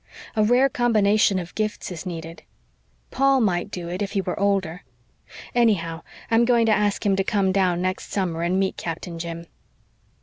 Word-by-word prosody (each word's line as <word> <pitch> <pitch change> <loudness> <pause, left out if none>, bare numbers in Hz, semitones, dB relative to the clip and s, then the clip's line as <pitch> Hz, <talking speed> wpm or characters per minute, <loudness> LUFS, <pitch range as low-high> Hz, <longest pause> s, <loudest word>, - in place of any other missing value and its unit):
A 215 - +3
rare 245 +5 +4
combination 215 -5 +2
of 180 -1 -5
gifts 215 -3 -3
is 180 +2 -7
needed. 165 -1 -7 0.7
Paul 275 0 +3
might 190 -4 0
do 175 -3 -6
it 180 +3 -4
if 200 -1 -3
he 195 - +1
were 180 -1 -4
older. 195 -4 0 0.7
Anyhow, 175 -9 +1 0.3
I'm 225 +1 +5
going 235 -1 +3
to 225 - +3
ask 210 0 +1
him 200 -1 +3
to 195 - +2
come 195 -2 +1
down 185 -2 +1
next 185 +1 -3
summer 175 -5 -1
and 175 +2 +1
meet 195 -1 -1
Captain 170 0 -5
Jim." 170 0 -6
195 Hz, 175 wpm, -23 LUFS, 175-215 Hz, 0.7 s, I'm